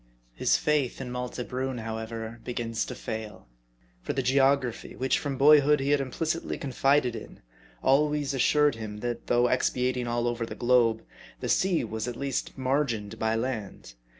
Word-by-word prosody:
His - - +2
faith 150 -5 0
in 130 -2 -5
Malte 125 0 -4
Brun, 130 0 -3
however, 110 0 -5
begins 115 -2 -2
to - - -6
fail; 110 - -6 0.5
for - - -3
the 135 - -1
geography, 135 -1 +1
which 130 +1 +1
from 140 -2 -3
boyhood 150 +1 +6
he 135 +1 0
had 145 -1 +3
implicitly 160 +5 -2
confided 135 -2 +1
in, 110 - -10 0.4
always 145 0 +2
assured 145 +3 +3
him, 110 -2 -7
that 120 -1 -4
though 120 0 +3
expatiating 125 0 0
all 120 0 0
over 120 -1 -1
the 115 - -5
globe, 120 -2 +3 0.4
the - - -4
sea 185 -6 +2
was 110 0 -4
at 120 - -4
least 140 -1 -3
margined 125 -6 -1
by 110 0 +1
land. 115 - -4
125 Hz, 160 wpm, -27 LUFS, 115-140 Hz, 0.5 s, boyhood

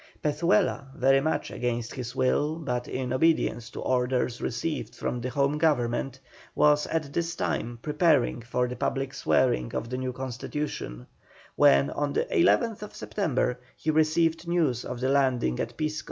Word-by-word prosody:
Pezuela, 155 0 +1
very 135 +2 +4
much 150 0 -1
against 120 -1 -2
his 125 -1 -6
will 145 +4 +1
but 125 -7 -3
in 130 -1 -3
obedience 130 -6 +1
to - - -8
orders 125 -1 0
received 140 +5 -3
from 120 - -3
the 125 - -3
Home 140 +2 +1
Government, 135 -4 +1 0.4
was 150 0 +4
at 155 -4 -2
this 170 +1 -1
time 120 +2 -2
preparing 150 -6 +2
for 125 +2 -1
the 125 - -5
public 135 +1 -2
swearing 90 - +1
of 115 - -3
the 125 - -2
new 130 0 -2
constitution, 125 - -5 0.5
when, 70 0 +5
on 145 -1 -2
the - - +1
11th 210 +4 +1
September, 135 -9 -1 0.2
he 155 - 0
received 160 +2 +2
news 155 -9 +1
of 125 - -5
the 130 - +1
landing 130 - +2
at - - -4
Pisco. 155 0 -1
135 Hz, 155 wpm, -27 LUFS, 125-155 Hz, 0.5 s, when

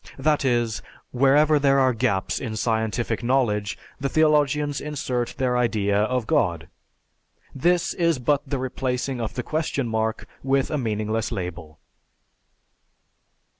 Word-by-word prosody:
That 150 +2 +1
is, 120 -4 0 0.3
wherever 145 +4 +4
there 140 -1 +3
are 130 -2 +3
gaps 115 -5 0
in 115 -5 -4
scientific 110 +1 -1
knowledge, 120 -5 0 0.2
the 140 - -1
theologians 150 -2 +2
insert 130 -5 -3
their 125 -2 +1
idea 110 -5 +1
of 110 +3 +1
God! - - 0 0.9
This 175 +5 +1
is 170 -4 +1
but 140 +3 +1
the 140 - -1
replacing 130 0 -2
of 110 - -4
the - - -3
question 155 -4 -2
mark 110 0 -1 0.2
with 135 0 +1
a 150 - 0
meaningless 110 -1 -2
label. 85 -4 -6
125 Hz, 130 wpm, -24 LUFS, 110-140 Hz, 0.9 s, wherever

